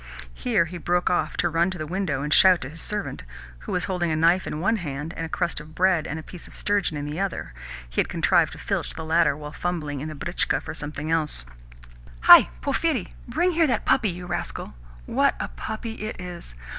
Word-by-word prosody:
Here - - +1
he 175 +1 -7
broke 175 +2 +1
off 175 - 0
to 175 - +2
run 170 +2 +2
to 185 - -5
the 155 - -4
window 165 -5 -2
and 150 +1 0
shout 185 -2 +7
to 130 - -5
his 160 +2 -9
servant 210 -1 -3 0.4
(who - - -7
was 180 - 0
holding 180 -3 -1
a 155 - +1
knife 170 +4 +3
in 150 - -3
one 205 +7 +2
hand 150 -2 -5
and 165 - -3
a - - -14
crust 175 0 -1
of 155 +1 -12
bread 180 -3 +3
and 155 - -4
a 160 - -7
piece 175 0 -11
of - - -15
sturgeon 200 -6 0
in 145 - -4
the 150 +4 -4
other 195 - -3 0.3
he - - +1
had - - -3
contrived - - +3
to - - -10
filch - - -3
the 160 - -6
latter 160 -3 +3
while 150 -1 -7
fumbling 155 -5 -3
in 155 - -4
the 155 - -6
britchka 170 +5 0
for 160 - -7
something 150 0 -5
else): 155 - 0 0.8
"Hi, - - +9
Porphyri! - - 0
Bring 365 - +1
here 330 -1 +3
that 240 -5 0
puppy, 260 -5 +3
you 180 0 -6
rascal! 180 - -4 0.3
What - - +2
a - - -3
puppy 220 - -5
it 215 -2 -6
is! 175 - -8
170 Hz, 225 wpm, -25 LUFS, 150-185 Hz, 0.8 s, Hi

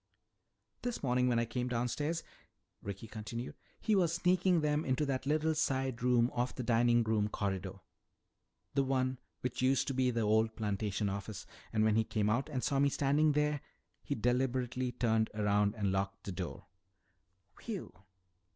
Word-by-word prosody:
"This 245 -8 -3
morning 125 -1 +2
when 120 -2 +2
I 115 - +2
came 125 +2 -2
downstairs," 125 +7 -1 0.6
Ricky 100 +2 -6
continued, 115 +2 -6 0.3
"he 220 - +2
was 170 -4 +2
sneaking 180 0 +3
them 150 0 +1
into 135 +3 +1
that 135 -1 -2
little 155 +2 +2
side 135 -5 0
room 125 -1 +3
off 120 +1 -1
the 125 - -3
dining 120 0 +4
room 110 -2 +1
corridor, 95 -3 -3 1.0
the 140 - +3
one 130 -1 0 0.2
which 125 0 -3
used 130 +1 +3
to - - -1
be 130 -1 +2
the 115 -1 0
old 110 +1 +2
plantation 105 -1 -1
office. 100 +1 -5 0.3
And 110 -1 +2
when 110 0 +3
he 110 - +4
came 105 -1 0
out 130 +7 0
and 130 -4 -2
saw 140 - +1
me 140 0 +4
standing 145 +2 +2
there, 150 -1 +1 0.4
he - - -2
deliberately 125 +1 0
turned 110 -2 +1
around 105 0 +2
and 100 -3 0
locked 95 0 -2
the 100 - -5
door!" 90 - -5 0.9
"Whew!" 215 -6 -6
125 Hz, 165 wpm, -33 LUFS, 110-140 Hz, 1.0 s, dining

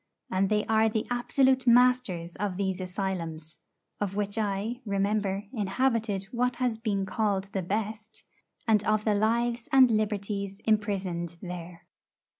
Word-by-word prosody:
And 190 +1 +2
they 210 0 +1
are 220 0 +3
the 220 0 -1
absolute 260 +1 +2
masters 240 -9 +3
of 200 -3 -2
these 190 -1 -1
asylums 170 -5 -4 0.4
(of 195 -2 -2
which 205 -1 -2
I, 215 +3 -2
remember, 200 -1 0
inhabited 220 -1 0
what 250 0 0
has 240 -3 -1
been 205 -4 -1
called 200 -1 -1
the 190 - 0
best), 215 +3 -4 0.4
and 215 -2 +4
of 215 0 +2
the 215 - +3
lives 235 +3 0
and 260 -3 +7
liberties 200 -2 -1
imprisoned 190 -6 -1
there. 175 -1 -8
210 Hz, 135 wpm, -28 LUFS, 190-225 Hz, 0.4 s, and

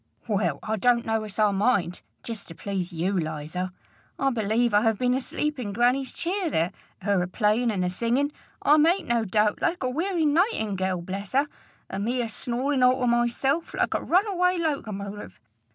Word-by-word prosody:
"Well, 210 -2 0
I 220 0 -1
don't 240 +2 +3
know 225 0 0
as 205 -2 -9
I 210 -1 +4
mind 195 -3 +1 0.2
jest 225 -3 -6
to 165 - -9
please 195 -1 -3
you, 175 +4 -1
Liza. 160 +2 -3 0.5
I 270 0 +1
believe 225 0 +1
I 205 - +5
ha' 225 -2 +2
been 250 +2 +2
asleep 285 +2 -2
in 205 -5 -4
grannie's 250 +4 +2
cheer 365 0 -1
there, 170 - +1 0.3
her 200 -2 +2
a 180 - -1
playin' 215 +5 +1
an' 195 -4 0
a 180 - +1
singin', 240 +9 0 0.3
I 300 - +6
make 335 +4 +3
no 235 -1 +1
doubt, 210 +1 +1
like 345 -4 0
a 255 - +1
werry 335 +3 0
nightingerl, 205 - +1
bless 195 +3 -5
her, 280 +3 +3 0.4
an' 195 +1 -4
me 245 +4 0
a 230 - -4
snorin' 255 +5 -1
all 250 +1 +5
to - - +2
myself, 240 +6 +1
like - - +1
a - - 0
runaway 365 -1 +2
locomotive! 210 - -4
235 Hz, 185 wpm, -26 LUFS, 200-275 Hz, 0.5 s, I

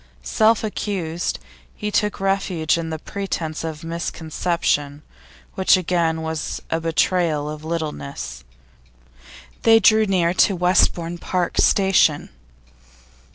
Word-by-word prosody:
Self 220 - +2
accused, 185 -6 -3 0.4
he 210 -1 -4
took 210 0 0
refuge 195 -4 0
in 165 -1 -3
the 160 - -3
pretence 165 -3 -4
of 160 -1 -6
misconception, 160 -3 -2 0.5
which 190 -1 +4
again 165 -3 0
was 160 -1 -3
a 165 - 0
betrayal 165 -2 +1
of 150 0 -7
littleness. 140 - -5 1.2
They 225 0 +6
drew 220 -1 +4
near 175 -3 +2
to 195 +1 +3
Westbourne 175 -1 +1
Park 180 0 -2
station. 190 -6 +3
170 Hz, 110 wpm, -21 LUFS, 160-190 Hz, 1.2 s, They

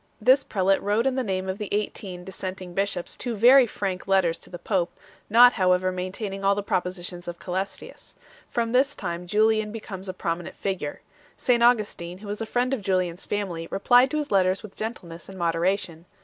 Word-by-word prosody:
This 260 +5 +5
prelate 195 -1 +1
wrote 210 +4 +1
in 265 - +2
the 260 - 0
name 190 -5 -2
of 190 +2 -3
the 210 - -4
eighteen 195 -3 -3
dissenting 185 -1 -7
bishops 195 -2 -2
two 240 -2 -4
very 250 +4 +7
frank 195 -4 -4
letters 190 -4 +2
to - - -15
the 175 - -7
pope, 175 -1 -1 0.4
not 245 +3 +8
however 185 -1 +2
maintaining 195 +2 -5
all 200 0 +4
the 205 - -2
propositions 180 -2 -3
of 175 0 -5
Cselestius. 190 +3 -6 0.3
From 230 -1 -1
this 270 +3 +2
time 175 -2 -5
Julian 215 +2 +2
becomes 195 -4 -6
a - - -3
prominent 170 -1 -3
figure. 190 -7 -4 0.4
St 240 -2 +2
Augustin, 210 -7 +2
who 205 +2 -11
was 205 +2 -4
a 225 - -3
friend 245 +3 0
of 260 - -2
Julian 185 -3 0
s 175 - -6
family, 180 -5 -3
replied 245 +6 +4
to 305 - -2
his 295 -5 -3
letters 190 0 +2
with 210 -2 -11
gentleness 175 -7 -6
and 190 - -10
moderation. 170 0 -1
195 Hz, 190 wpm, -25 LUFS, 180-220 Hz, 0.4 s, not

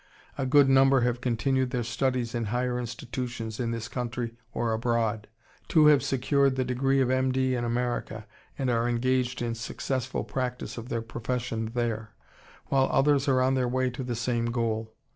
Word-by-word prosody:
A 135 -2 -2
good 140 +1 +6
number 135 0 +5
have 120 0 0
continued 130 +1 +1
their 125 -2 -1
studies 120 +1 -1
in 120 -2 -1
higher 125 +3 -1
institutions 120 -1 -5
in 120 -2 -1
this 115 -1 -3
country 120 -1 -4 0.2
or 115 -1 -1
abroad. 115 -2 0 0.4
Two 155 -2 +5
have 150 -2 +6
secured 135 +1 +2
the 130 -1 0
degree 135 +2 +1
of 130 -1 +2
M. 130 0 +2
D. 130 0 +1
in 120 -1 -1
America, 120 +1 -2 0.3
and 130 -2 0
are 115 0 +1
engaged 125 0 0
in 115 -1 -1
successful 130 +2 -3
practice 125 -1 -4
of 120 +1 -7
their 115 -1 -2
profession 115 -1 -3
there, 115 -3 -2 0.5
while 135 -1 +3
others 140 +1 +3
are 130 -2 +3
on 130 +1 +2
their 130 -2 +1
way 130 +1 0
to 130 +2 -5
the 125 -1 -3
same 120 0 -1
goal. 115 -2 -1
125 Hz, 180 wpm, -27 LUFS, 115-130 Hz, 0.5 s, good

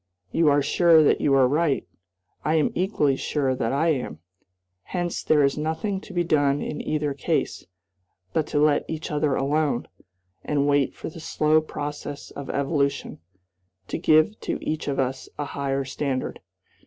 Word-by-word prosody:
You 165 -2 +3
are 145 0 +3
sure 165 +2 +5
that - - +3
you 140 -2 +3
are 130 -2 +5
right. 145 - +1 0.6
I 155 - +1
am 155 - +2
equally 165 -7 +1
sure 135 -1 0
that 115 -3 -1
I 150 +5 +2
am. 130 - -1 0.7
Hence 175 -2 -2
there 150 -2 +3
is 140 +2 +1
nothing 190 +6 -2
to 210 - -12
be 175 -2 0
done 145 -3 +2
in 150 - -4
either 150 -2 -1
case 135 - -2 0.7
but 155 - +1
to 145 - 0
let 150 -1 +3
each 160 -1 -5
other 150 -2 +1
alone, 145 -2 0 0.6
and 145 -1 0
wait 145 -1 +2
for - - -6
the 165 - -10
slow 155 0 +2
process 145 -1 -6
of 140 -2 -8
evolution 140 -1 -1 0.7
to - - -2
give 155 +7 +4
to - - -3
each 155 - -2
of 140 -1 -1
us 130 0 -2
a 145 - -2
higher 140 -1 -2
standard." 135 0 -3
145 Hz, 165 wpm, -25 LUFS, 140-155 Hz, 0.7 s, sure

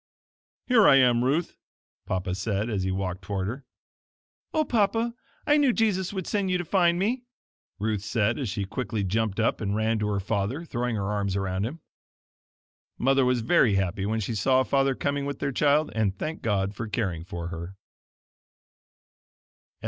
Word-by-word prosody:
"Here 230 -5 +5
I - - +8
am, 125 -3 +4
Ruth," 150 +7 0 0.5
Papa 95 0 -2
said, 100 +3 -2
as 100 -3 -1
he 95 - -1
walked 95 0 -3
toward 95 0 -3
her. 130 +7 -5 0.9
"Oh, 310 -1 +1
Papa, 230 0 +1 0.3
I 295 - +4
knew 285 -3 +4
Jesus 205 -6 +1
would 190 -3 -4
send 200 -2 -1
you 180 - +2
to 175 - -4
find 175 -1 +3
me!" 225 +7 0 0.6
Ruth 105 -1 -1
said 110 +1 0
as 130 -6 -2
she 100 +1 -2
quickly 110 0 -3
jumped 110 +2 -1
up 115 - +1
and 100 -1 -1
ran 110 +1 +1
to 105 - -1
her 100 -1 0
father, 105 - -2
throwing 120 -5 -2
her 100 -1 -2
arms 100 -2 -1
around 95 +1 -1
him. 155 +6 -8 1.2
Mother 135 +1 +3
was 125 -1 +2
very 120 - +4
happy 95 +1 -1
when 110 +1 0
she 110 +2 -2
saw 130 +4 +3
father 135 0 +1
coming 140 +1 -1
with 140 - -4
their 140 - -2
child, 150 +3 +2
and 105 -3 0
thanked 160 +9 -4
God 100 -2 0
for 115 +1 -5
caring 95 -7 -2
for 85 -2 -6
her. 85 +2 -7
115 Hz, 175 wpm, -26 LUFS, 100-145 Hz, 1.2 s, I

